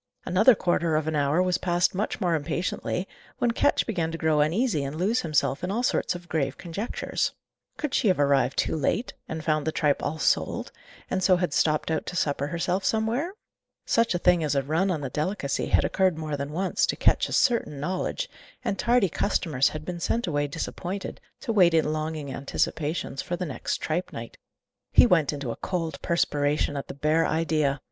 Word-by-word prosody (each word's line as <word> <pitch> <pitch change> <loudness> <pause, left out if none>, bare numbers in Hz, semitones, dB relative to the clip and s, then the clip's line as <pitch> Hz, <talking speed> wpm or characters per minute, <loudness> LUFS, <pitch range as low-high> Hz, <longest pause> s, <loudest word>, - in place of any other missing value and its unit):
Another 215 +7 +5
quarter 170 -3 +1
of 155 0 0
an 160 - -1
hour 145 +4 +2
was 180 -1 +1
passed 175 0 +1
much 200 +3 -2
more 180 -5 +1
impatiently, 170 +4 -2 0.3
when 240 - +2
Ketch - - +2
began 170 -7 -1
to 165 - -4
grow 160 -2 +2
uneasy 165 - +1
and 140 +2 -4
lose 200 +9 +1
himself 150 -2 0
in 180 - -1
all 225 +5 -1
sorts 185 - +1
of 175 0 -9
grave 140 -5 -1
conjectures. 190 +7 -3 0.4
Could 300 -4 -3
she - - +2
have 185 -5 +3
arrived 140 -1 +2
too - - +1
late, 160 - -1 0.2
and 160 0 -4
found 155 -1 +1
the - - +2
tripe 150 -2 +1
all 160 - -2
sold, - - 0 0.4
and 190 - 0
so 185 0 +5
had 175 -4 -1
stopped 155 +1 +1
out 160 - -1
to - - -5
supper 145 -4 0
herself 175 +4 -1
somewhere? 225 - 0 0.5
Such 230 -5 +2
a - - +3
thing 175 -1 +3
as 145 -2 0
a 140 - +2
run 160 +8 +1
on 165 -5 -1
the 135 -3 -4
delicacy 150 -1 -1
had - - +3
occurred 185 -4 +2
more 155 -2 -3
than 140 +1 -4
once, 185 +4 0
to - - -1
Ketch's - - +2
certain 230 - +1
knowledge, 185 - -2 0.4
and 200 - -1
tardy 240 -4 +3
customers 155 -6 +1
had 155 0 -7
been 175 0 -5
sent 230 +7 0
away 145 -4 0
disappointed, 175 +5 -5 0.2
to 230 - -2
wait 180 -5 +5
in 155 -1 +2
longing 155 -3 -3
anticipations 145 +1 -2
for 180 - -3
the 180 +1 -3
next 145 - -3
tripe 170 +4 -2
night. - - -8 0.5
He - - +7
went 170 - +3
into 140 -5 -4
a - - -4
cold 165 -6 -3
perspiration 145 -3 +1
at 140 - -4
the - - -7
bare 155 +3 +2
idea. 155 -4 +1
165 Hz, 200 wpm, -26 LUFS, 150-185 Hz, 0.5 s, He